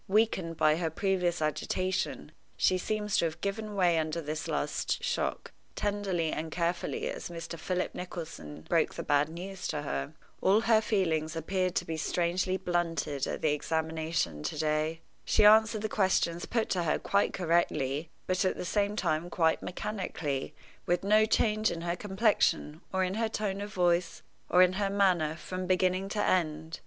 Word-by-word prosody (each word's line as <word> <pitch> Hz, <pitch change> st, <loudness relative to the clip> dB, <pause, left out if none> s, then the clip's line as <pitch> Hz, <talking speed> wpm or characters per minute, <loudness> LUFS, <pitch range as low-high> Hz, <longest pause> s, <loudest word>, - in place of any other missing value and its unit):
Weakened 190 Hz, -5 st, +1 dB
by 155 Hz, 0 st, +4 dB
her 165 Hz, -1 st, -1 dB
previous 180 Hz, -1 st, 0 dB
agitation, 185 Hz, +4 st, -2 dB, 0.3 s
she 185 Hz, -, +3 dB
seems 210 Hz, +1 st, -1 dB
to -, -, +3 dB
have 160 Hz, 0 st, -3 dB
given 205 Hz, +2 st, -3 dB
way 175 Hz, -4 st, +3 dB
under 160 Hz, +1 st, -2 dB
this 155 Hz, 0 st, -4 dB
last 480 Hz, -, -1 dB
shock, 485 Hz, 0 st, -2 dB, 0.2 s
tenderly 195 Hz, -6 st, -1 dB
and 160 Hz, +1 st, -4 dB
carefully 170 Hz, +1 st, -1 dB
as -, -, -5 dB
Mr. 170 Hz, 0 st, -6 dB
Philip 180 Hz, +2 st, -2 dB
Nicholson 165 Hz, -, -7 dB
broke -, -, +1 dB
the -, -, -4 dB
bad 145 Hz, +1 st, +2 dB
news 180 Hz, +3 st, -6 dB
to 150 Hz, -, -3 dB
her. 70 Hz, -, -3 dB, 0.3 s
All 200 Hz, +3 st, +4 dB
her 225 Hz, -1 st, +4 dB
feelings 165 Hz, -7 st, 0 dB
appeared 185 Hz, +2 st, -1 dB
to -, -, 0 dB
be 160 Hz, -1 st, -3 dB
strangely 175 Hz, +4 st, 0 dB
blunted 165 Hz, -6 st, -1 dB
at -, -, -4 dB
the 155 Hz, -, +3 dB
examination 160 Hz, -, -1 dB
to 150 Hz, -, -3 dB
day. 155 Hz, +1 st, 0 dB, 0.2 s
She 210 Hz, -, +3 dB
answered 220 Hz, 0 st, +6 dB
the -, -, +1 dB
questions 185 Hz, -5 st, +1 dB
put 230 Hz, -2 st, 0 dB
to 180 Hz, -, +1 dB
her 160 Hz, -3 st, +1 dB
quite 200 Hz, 0 st, +1 dB
correctly, 160 Hz, -4 st, 0 dB, 0.2 s
but 185 Hz, +1 st, +1 dB
at 185 Hz, -, 0 dB
the -, -, -4 dB
same 205 Hz, +2 st, 0 dB
time 165 Hz, -5 st, 0 dB
quite 160 Hz, -2 st, +2 dB
mechanically, 180 Hz, -8 st, -4 dB, 0.3 s
with 175 Hz, +1 st, +1 dB
no 215 Hz, +2 st, +5 dB
change 215 Hz, 0 st, +2 dB
in 165 Hz, -, -4 dB
her 170 Hz, 0 st, -1 dB
complexion, 190 Hz, -6 st, +1 dB
or 190 Hz, 0 st, +1 dB
in 185 Hz, 0 st, -1 dB
her 225 Hz, +1 st, 0 dB
tone 200 Hz, -2 st, -2 dB
of 205 Hz, 0 st, -5 dB
voice, 175 Hz, -2 st, +1 dB, 0.3 s
or 180 Hz, +1 st, +7 dB
in 185 Hz, 0 st, +3 dB
her 200 Hz, -, +1 dB
manner, 180 Hz, -6 st, +2 dB
from 185 Hz, +2 st, -5 dB
beginning 185 Hz, +1 st, +1 dB
to 205 Hz, -, -1 dB
end. 160 Hz, -2 st, 0 dB
175 Hz, 170 wpm, -30 LUFS, 160-195 Hz, 0.3 s, or